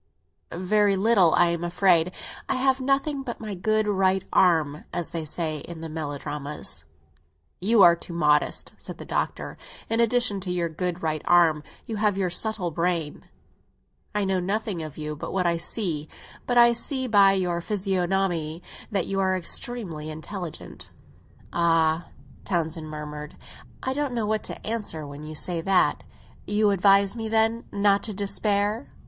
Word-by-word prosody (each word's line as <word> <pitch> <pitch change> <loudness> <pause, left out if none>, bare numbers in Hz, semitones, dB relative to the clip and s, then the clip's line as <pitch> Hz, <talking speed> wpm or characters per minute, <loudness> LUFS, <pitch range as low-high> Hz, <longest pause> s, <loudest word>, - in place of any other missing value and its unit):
Very 200 +3 +2
little, 195 -4 +4
I 175 0 +4
am 170 0 -2
afraid. 175 -1 +3 0.4
I - - +2
have 265 0 +2
nothing 275 +2 +1
but 245 -3 -6
my 215 -2 -5
good 215 +3 +1
right 190 -2 +2
arm, 160 -2 +3
as 175 - -2
they 165 -2 -4
say 155 0 -2
in 165 +3 -8
the 165 - -6
melodramas." 150 -1 -4 0.7
"You 210 +2 +5
are 170 -1 +8
too 170 0 -9
modest," 150 -3 +1
said - - -8
the - - -9
Doctor. - - -3 0.3
"In 225 - +2
addition 235 -3 +2
to 185 -1 -4
your 175 -2 0
good 180 +2 -3
right 155 -1 -1
arm, 170 -3 +4 0.2
you 225 -3 -4
have 205 -2 +1
your 185 -3 0
subtle 205 -2 -1
brain. 165 -2 -2 0.9
I 205 -1 +1
know 190 -1 +1
nothing 195 0 -2
of 155 -2 -7
you 150 -1 -4
but 150 - -6
what 185 -1 0
I 170 -1 +2
see; 165 -4 -1 0.4
but 245 - +1
I 235 0 +7
see 260 +2 0
by 200 -3 +6
your 180 -3 0
physiognomy 185 -4 -1 0.3
that 195 -4 0
you 195 0 -2
are 190 -1 +2
extremely 175 -4 -3
intelligent." 165 +2 -7 0.6
"Ah," 165 -1 +2 0.4
Townsend 160 -3 -2
murmured, 150 0 -7 0.5
"I 260 - 0
don't 285 -2 -2
know 225 -2 0
what 215 0 0
to - - -7
answer 210 -9 -3
when 145 +1 -9
you 155 +1 -7
say 170 +2 -2
that! 190 +2 +2 0.4
You 210 0 +3
advise 195 +1 +4
me, 225 -1 -4
then, 225 +1 +1
not 200 0 +3
to 215 -3 -4
despair?" 205 +3 0
185 Hz, 160 wpm, -25 LUFS, 165-210 Hz, 0.9 s, are